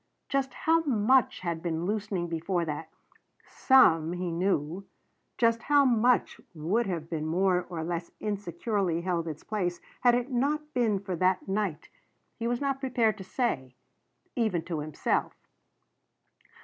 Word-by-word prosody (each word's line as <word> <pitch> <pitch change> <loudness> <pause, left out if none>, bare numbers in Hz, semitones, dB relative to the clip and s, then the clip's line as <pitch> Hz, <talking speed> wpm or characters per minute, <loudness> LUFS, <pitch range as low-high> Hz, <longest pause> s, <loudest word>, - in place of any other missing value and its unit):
Just 270 -2 -1
how 325 +1 +3
much 260 -4 +2
had 170 -2 -3
been 165 0 -2
loosening 200 -3 -2
before 170 +1 -1
that 155 +1 -5 0.6
some, 165 - +4
he 180 -1 -3
knew 175 0 -1 0.5
just 230 -1 +3
how 285 +1 +4
much 245 0 +2
would 190 +10 0
have 165 -3 -4
more 175 +3 +1
or 165 -3 -4
less 170 0 -3
insecurely 200 -3 -1
held 170 -2 -1
its 155 -1 -6
place 180 -5 -2 0.2
had 245 -1 +5
it 245 +2 -2
not 295 +4 -1
been 230 -5 +2
for 190 -1 -4
that 185 +3 +1
night, 195 -5 -2 0.5
he 230 - -1
was 240 0 0
not 275 -1 -1
prepared 240 -5 +1
to - - -6
say 145 - -2 0.6
even 215 -9 0
to 170 -2 -4
himself. 150 0 -1
190 Hz, 140 wpm, -28 LUFS, 170-240 Hz, 0.6 s, had